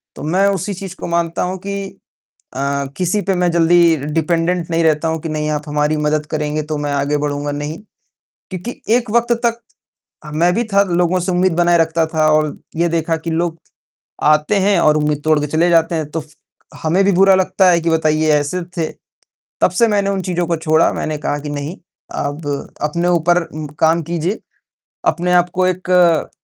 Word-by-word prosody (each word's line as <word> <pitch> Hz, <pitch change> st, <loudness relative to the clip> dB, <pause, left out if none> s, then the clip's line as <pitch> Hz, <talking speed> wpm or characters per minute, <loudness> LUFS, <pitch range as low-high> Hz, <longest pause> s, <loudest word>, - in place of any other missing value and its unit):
तो -, -, -9 dB
मैं 185 Hz, +6 st, +2 dB
उसी 200 Hz, +1 st, -2 dB
चीज़ 190 Hz, 0 st, -7 dB
को -, -, -5 dB
मानता 170 Hz, -1 st, -1 dB
हूँ 185 Hz, +1 st, -3 dB
कि 200 Hz, -, -3 dB, 0.8 s
अ, 140 Hz, +1 st, -1 dB
किसी 185 Hz, +3 st, 0 dB
पे 195 Hz, -, +3 dB
मैं 180 Hz, 0 st, +1 dB
जल्दी 170 Hz, 0 st, +4 dB, 0.2 s
डिपेंडेंट 165 Hz, +1 st, 0 dB
नहीं 165 Hz, 0 st, +1 dB
रहता 155 Hz, 0 st, +2 dB
हूँ 160 Hz, 0 st, -1 dB
कि 165 Hz, -, -5 dB
नहीं 155 Hz, 0 st, -2 dB
आप 150 Hz, -1 st, -2 dB
हमारी 150 Hz, +1 st, 0 dB
मदद 150 Hz, 0 st, 0 dB
करेंगे, 150 Hz, 0 st, -1 dB
तो 150 Hz, 0 st, -4 dB
मैं 145 Hz, -1 st, -3 dB
आगे 140 Hz, +1 st, 0 dB
बढ़ूँगा, 145 Hz, 0 st, -2 dB
नहीं। 145 Hz, +3 st, -4 dB, 0.7 s
क्योंकि 185 Hz, +7 st, -5 dB, 0.2 s
एक 245 Hz, -3 st, -2 dB
वक़्त 235 Hz, +2 st, +2 dB
तक 235 Hz, 0 st, -1 dB, 0.7 s
ह 150 Hz, -, -8 dB
मैं 175 Hz, +2 st, +3 dB
भी 235 Hz, -, +1 dB
था, 200 Hz, 0 st, +5 dB
लोगों 180 Hz, -1 st, +1 dB
से 180 Hz, +1 st, -2 dB
उम्मीद 180 Hz, 0 st, +2 dB
बनाए 175 Hz, 0 st, +3 dB
रखता 165 Hz, 0 st, +1 dB
था 155 Hz, -1 st, +1 dB
और 155 Hz, -1 st, +1 dB, 0.2 s
ये 170 Hz, +1 st, +1 dB
देखा 165 Hz, 0 st, 0 dB
कि 160 Hz, +1 st, -6 dB
लोग 165 Hz, 0 st, -1 dB, 0.7 s
आते 150 Hz, +6 st, +3 dB
हैं 195 Hz, -1 st, +3 dB
और 155 Hz, -2 st, +4 dB
उम्मीद 150 Hz, -1 st, 0 dB
तोड़के 155 Hz, -1 st, +2 dB
चले 160 Hz, +4 st, +2 dB
जाते 165 Hz, 0 st, +3 dB
हैं 155 Hz, -2 st, -3 dB
तो 165 Hz, -, -2 dB
फ 155 Hz, -, -17 dB, 0.5 s
हमें 170 Hz, +5 st, +2 dB
भी 200 Hz, -, +4 dB
बुरा 195 Hz, +1 st, +5 dB
लगता 190 Hz, 0 st, +3 dB
है 170 Hz, -1 st, +4 dB
कि 165 Hz, -, 0 dB
बताइए 155 Hz, -1 st, +1 dB
ऐसे 150 Hz, +5 st, 0 dB, 0.2 s
थे। 165 Hz, -, +1 dB, 0.8 s
तब -, -, +4 dB
से 230 Hz, +6 st, +3 dB
मैंने 200 Hz, -2 st, +1 dB
उन 195 Hz, -1 st, -1 dB
चीज़ों 175 Hz, -1 st, -1 dB
को 170 Hz, 0 st, 0 dB
छोड़ा, 160 Hz, 0 st, +2 dB
मैंने 155 Hz, -1 st, -3 dB
कहा 145 Hz, 0 st, -2 dB
कि 145 Hz, +1 st, -7 dB
नहीं, 145 Hz, +4 st, -4 dB, 0.4 s
अब 145 Hz, +2 st, -4 dB, 0.3 s
अपने 170 Hz, +4 st, -1 dB
ऊपर 175 Hz, 0 st, +3 dB
उ 155 Hz, -2 st, -7 dB
काम 160 Hz, +1 st, +3 dB
कीजिए। 170 Hz, +5 st, -2 dB, 0.7 s
अपने 180 Hz, 0 st, +1 dB
आप 180 Hz, 0 st, +3 dB
को 185 Hz, -, +3 dB
एक, 180 Hz, -2 st, +2 dB
165 Hz, 195 wpm, -17 LUFS, 155-180 Hz, 0.8 s, था